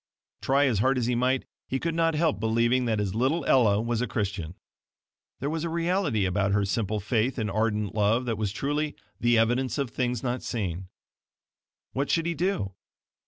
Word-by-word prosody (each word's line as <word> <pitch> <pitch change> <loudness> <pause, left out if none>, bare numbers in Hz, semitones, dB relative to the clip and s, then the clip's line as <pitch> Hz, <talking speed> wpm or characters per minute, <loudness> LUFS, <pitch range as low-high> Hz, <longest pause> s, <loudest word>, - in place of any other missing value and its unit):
Try 140 +2 +3
as 120 -7 +1
hard 130 +4 +3
as 125 - 0
he 125 - +1
might 125 +2 +1 0.2
he 130 - -1
could 165 +3 -1
not 165 -1 +2
help 160 -4 +1
believing 115 +3 +2
that 110 -2 +1
his 100 -2 -1
little 130 +9 +1
Ella 110 -6 +4
was 115 +1 -1
a 125 - 0
Christian. 100 -6 -3 0.8
There 140 - -2
was 160 0 -2
a 170 - -1
reality 165 - +1
about 95 +1 +1
her 100 0 +2
simple 105 +1 -1
faith 115 +5 0
and 110 -3 -1
ardent 105 -2 0
love 110 +4 +2
that 115 -2 -1
was 105 -3 -1
truly 145 +6 -2 0.2
"the 120 0 +3
evidence 120 +4 +1
of 140 -5 -2
things 125 -2 -1
not 125 0 -1
seen." 95 -6 -3 1.1
What 140 +2 -1
should 165 -1 +2
he 170 - 0
do? 165 - -1
120 Hz, 190 wpm, -27 LUFS, 105-140 Hz, 1.1 s, Ella